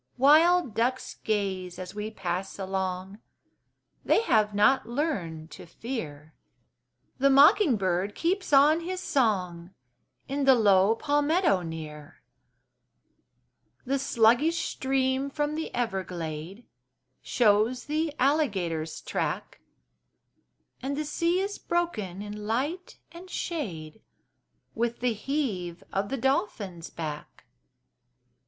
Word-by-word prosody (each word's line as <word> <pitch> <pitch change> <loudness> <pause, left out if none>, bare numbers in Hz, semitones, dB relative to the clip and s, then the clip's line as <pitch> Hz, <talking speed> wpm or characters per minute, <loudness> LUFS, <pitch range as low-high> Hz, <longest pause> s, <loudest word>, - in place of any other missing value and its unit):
Wild 310 +1 +5
ducks 250 +4 -1
gaze 190 -4 -2
as 185 +1 -7
we 210 +1 -4
pass 190 -2 -4
along: 190 0 -3 0.8
They - - +3
have 215 - +2
not 235 +5 +3
learned 180 - -3
to - - -11
fear; 160 - -7 0.9
The 275 +1 +4
mocking 280 - +6
bird 190 +1 -1
keeps 370 +2 -1
on 290 +3 +6
his 365 +2 -4
song 185 - -1 0.5
In 275 +1 -1
the 265 -1 +7
low 205 -1 +4
palmetto 290 - +2
near; 155 -2 -8 1.6
The 275 +2 0
sluggish 270 +7 +3
stream 265 +1 0
from 295 +1 -2
the 320 +1 -4
everglade 185 -3 -4 0.6
Shows 220 +2 +2
the 310 +1 -1
alligator's 190 - 0
track, - - -3 1.2
And 275 +2 -3
the 305 - -2
sea 335 +4 0
is 400 +1 -4
broken 215 - -2
in 210 0 -7
light 290 +11 -2
and 350 +2 -12
shade 215 - -5 0.7
With 235 +1 -2
the 245 -1 +1
heave 210 - -3
of 195 +1 -1
the 270 - -2
dolphin's 210 -9 -2
back. 150 -2 -7
225 Hz, 105 wpm, -27 LUFS, 185-285 Hz, 1.6 s, the